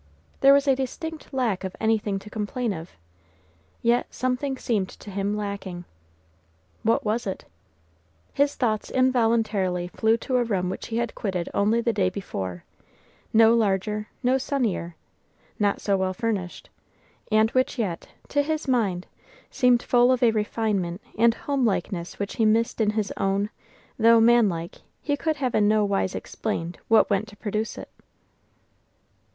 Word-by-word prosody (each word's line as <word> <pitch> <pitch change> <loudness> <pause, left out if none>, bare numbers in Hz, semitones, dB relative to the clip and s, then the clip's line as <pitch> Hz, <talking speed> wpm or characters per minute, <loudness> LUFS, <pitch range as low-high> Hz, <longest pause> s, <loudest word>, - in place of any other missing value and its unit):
There 275 - +7
was 280 0 +2
a 270 - +5
distinct 310 +5 -5
lack 240 -9 -1
of 190 -1 -5
anything 220 -2 +1
to 205 +2 -10
complain 220 +1 -2
of, 165 -1 -8 0.9
yet 235 +1 +2
something 255 +2 -2
seemed 205 -7 -1
to 205 - -11
him 200 +2 -1
lacking. 200 -4 -5 1.0
What 225 0 +1
was 220 +1 -1
it? 190 - -5 0.9
His 285 0 +2
thoughts 220 -4 -1
involuntarily 225 -8 +1
flew 220 +4 +2
to 255 +2 -1
a 245 - +3
room 185 -6 -1
which - - -6
he 225 - -3
had 235 -1 -1
quitted 185 -4 -3
only 215 +3 +2
the 235 -1 0
day 190 -3 +2
before, 95 - -5 0.7
no 225 0 +6
larger, 210 -1 0 0.2
no 255 +2 +3
sunnier, 225 - -2 0.6
not 205 -1 +1
so 200 -1 +1
well 190 0 -1
furnished, 200 -5 -3 0.6
and 220 +1 +4
which 255 +1 +1
yet, 195 -8 -3 0.2
to 290 - +2
his 310 +1 -2
mind, 205 -9 +1 0.5
seemed 250 -1 +3
full 245 0 +4
of 255 -1 +1
a 235 - +6
refinement 210 -4 -1 0.2
and 230 +1 +4
homelikeness 205 -10 -1
which 200 -1 -4
he 225 - +2
missed 225 +2 +2
in 210 - +3
his 210 -1 -1
own, 195 +2 0 0.5
though, 230 +1 +6
man 235 -1 +5
like, 170 -1 -6 0.2
he 290 - 0
could 315 +2 -1
have 260 -4 -2
in 205 - +3
no 215 0 +3
wise 195 -2 0
explained 175 -6 -4
what 225 -2 +4
went 200 +2 +1
to 205 -2 -14
produce 215 +1 -3
it. - - -8
220 Hz, 155 wpm, -25 LUFS, 195-240 Hz, 1.0 s, There